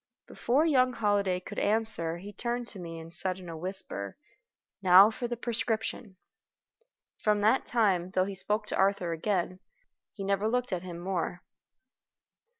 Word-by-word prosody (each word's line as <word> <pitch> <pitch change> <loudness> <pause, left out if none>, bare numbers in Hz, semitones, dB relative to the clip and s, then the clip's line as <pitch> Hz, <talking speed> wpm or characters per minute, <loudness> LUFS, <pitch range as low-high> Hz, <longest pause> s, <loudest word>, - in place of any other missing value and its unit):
Before 270 +7 +1
young 255 -5 +3
Holliday 205 -5 +1
could 180 - -7
answer 205 -6 +2
he 200 +4 -10
turned 240 +2 -3
to 200 - -6
me, 165 -2 -7
and 165 +1 -10
said 185 0 +1
in 185 -2 -11
a 165 - -6
whisper: 170 - -2 0.6
"Now 190 +3 +8
for 240 +2 -4
the 240 0 -4
prescription." 225 -3 -3 1.0
From 210 -1 +1
that 220 +6 +2
time, 195 -7 +1
though 185 0 +1
he 200 - -5
spoke 210 +3 -2
to - - -3
Arthur 190 -3 +1
again, 185 +1 -2 0.5
he 200 - -7
never 200 +2 0
looked 250 -1 -1
at 180 - -2
him 175 -2 -8
more. 175 -1 -3
195 Hz, 155 wpm, -29 LUFS, 180-225 Hz, 1.0 s, Now